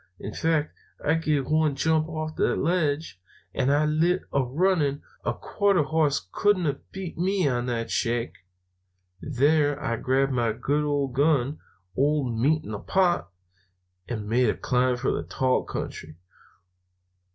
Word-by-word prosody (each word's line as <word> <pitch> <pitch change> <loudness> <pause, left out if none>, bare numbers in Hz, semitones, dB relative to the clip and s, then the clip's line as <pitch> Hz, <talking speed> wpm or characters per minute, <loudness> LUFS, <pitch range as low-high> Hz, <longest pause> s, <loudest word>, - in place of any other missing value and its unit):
In 105 - -6
fact, 160 -2 0 0.3
I 150 - +3
give 155 -4 0
one 155 -2 +2
jump 160 +2 +1
off 155 -1 -4
that - - +2
ledge, 155 - -1 0.3
and 135 +1 +1
I 145 +1 +3
lit 165 +4 +1
a 140 - +3
running. 145 +1 +1 0.2
A - - 0
quarter 200 -6 +1
hoss 150 - 0
couldn't 205 -4 +2
have 140 -2 -3
beat 190 -3 -7
me 190 +2 +1
to 125 -4 +1
that 115 -2 -2
shack. 120 0 -1 0.9
There 145 +1 +2
I 115 -4 -2
grabbed 135 +2 +1
my 120 -3 +1
good 145 +6 0
old 140 -3 -1
gun, 145 0 +2 0.4
old 140 -3 +1
Meat 150 +7 +2
in - - -8
the 105 - -4
pot, 175 - +1 0.8
and 110 -4 -4
made 120 +2 +3
a - - -1
climb 125 0 +1
for 125 - 0
the - - -1
tall 130 +10 0
country." 80 0 -6
145 Hz, 150 wpm, -26 LUFS, 125-160 Hz, 0.9 s, I